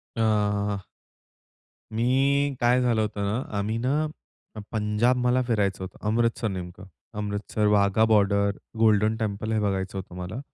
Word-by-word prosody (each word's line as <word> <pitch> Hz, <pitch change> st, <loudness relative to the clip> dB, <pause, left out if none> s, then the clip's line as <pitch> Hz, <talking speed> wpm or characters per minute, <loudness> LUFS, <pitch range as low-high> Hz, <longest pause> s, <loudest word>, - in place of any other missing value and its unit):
अ, 105 Hz, -2 st, +1 dB, 1.2 s
मी 135 Hz, +5 st, +2 dB
काय 120 Hz, +1 st, +4 dB
झालं 120 Hz, -3 st, +2 dB
होतं 105 Hz, -1 st, -2 dB
ना, 105 Hz, +5 st, -1 dB, 0.2 s
आम्ही 105 Hz, +2 st, -1 dB
ना 140 Hz, +6 st, +1 dB, 0.7 s
पंजाब 110 Hz, +3 st, +1 dB
मला 125 Hz, +1 st, +3 dB
फिरायचं 100 Hz, -5 st, 0 dB
होतं, 95 Hz, -, -10 dB
अमृतसर 115 Hz, +1 st, +1 dB
नेमकं. 90 Hz, -1 st, -7 dB, 0.3 s
Amritsar, 105 Hz, +1 st, -2 dB
Wagah 105 Hz, +1 st, +3 dB
border, 100 Hz, -2 st, +3 dB, 0.2 s
golden 110 Hz, 0 st, +3 dB
temple 110 Hz, 0 st, -3 dB
हे 110 Hz, -, +1 dB
बघायचं 95 Hz, -1 st, -2 dB
होतं 95 Hz, -2 st, -8 dB
मला. 90 Hz, +7 st, -5 dB
105 Hz, 130 wpm, -26 LUFS, 100-115 Hz, 1.2 s, काय